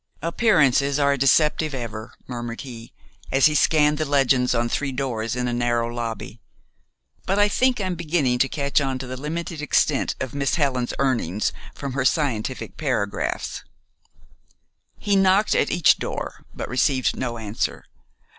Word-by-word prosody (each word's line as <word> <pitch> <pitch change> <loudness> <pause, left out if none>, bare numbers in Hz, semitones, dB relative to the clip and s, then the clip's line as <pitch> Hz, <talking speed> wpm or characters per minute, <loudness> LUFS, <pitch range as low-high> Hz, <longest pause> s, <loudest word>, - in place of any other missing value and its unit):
"Appearances 150 - +3
are 140 -1 +3
deceptive 150 +2 +2
ever," 115 -3 -6
murmured 120 -2 -5
he, 120 -4 -10 0.4
as 135 0 +4
he 155 - +5
scanned 150 +1 +3
the - - +1
legends 135 -3 +2
on 120 0 +1
three 135 +3 -2
doors 120 -4 -2
in 125 0 -1
a 120 - -1
narrow 120 -1 0
lobby; 115 -2 -5 0.9
"but 195 - +1
I 205 0 +5
think 250 +4 +2
I'm 185 -2 -1
beginning 155 -7 0
to 135 - +3
catch 140 0 0
on 135 -2 -1
to 130 - -6
the 130 +1 -6
limited 160 +3 -5
extent 150 -1 +1
of 130 - -4
Miss 140 -2 0
Helen's 135 -6 0
earnings 115 -8 0 0.2
from 140 -2 -5
her 135 -1 0
scientific 130 -3 -1
paragraphs." 125 -9 -2 1.3
He 205 -1 0
knocked 195 +2 +4
at - - +2
each 175 -3 +4
door; - - -5
but - - -6
received 130 +1 +1
no 120 -2 -3
answer. 110 -1 -3
135 Hz, 155 wpm, -23 LUFS, 120-150 Hz, 1.3 s, he